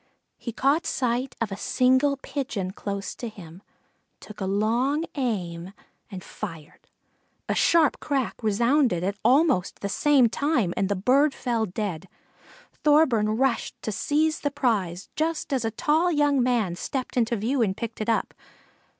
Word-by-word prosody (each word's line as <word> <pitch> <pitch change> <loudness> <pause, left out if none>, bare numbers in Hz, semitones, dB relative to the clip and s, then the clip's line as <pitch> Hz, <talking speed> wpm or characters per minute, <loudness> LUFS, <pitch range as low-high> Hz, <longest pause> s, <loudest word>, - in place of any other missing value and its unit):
He 235 - -5
caught 275 +8 +1
sight 250 +1 -1
of 225 -3 -2
a - - -3
single 260 +6 +2
Pigeon 260 -9 -4
close 200 0 -5
to 240 - -6
him, 180 -4 -12 0.6
took 215 -1 -12
a 190 - -1
long 235 - +1
aim 190 - -3 0.4
and 190 -4 -8
fired. 165 -7 -9 0.6
A - - 0
sharp 330 -4 +3
crack 275 -5 -2
resounded 235 - +2
at 200 +2 -2
almost 260 - +2
the 200 - -2
same 275 +2 +4
time 240 - 0
and 195 0 0
the 200 - +1
bird 270 +9 +3
fell 230 -3 -1
dead. 190 -2 -4 0.8
Thorburn 250 -9 +3
rushed 265 -2 0
to 220 - -2
seize 305 +8 0
the 290 - -1
prize 205 -10 -1
just 315 -2 -1
as 260 -3 0
a 225 - 0
tall 310 +10 +1
young 290 -3 +2
man 235 -8 +1
stepped 255 +7 -4
into 235 -1 +1
view 235 +5 0
and 195 -3 0
picked 230 -2 -5
it 215 - -2
up. 225 - 0
235 Hz, 155 wpm, -25 LUFS, 200-280 Hz, 0.8 s, same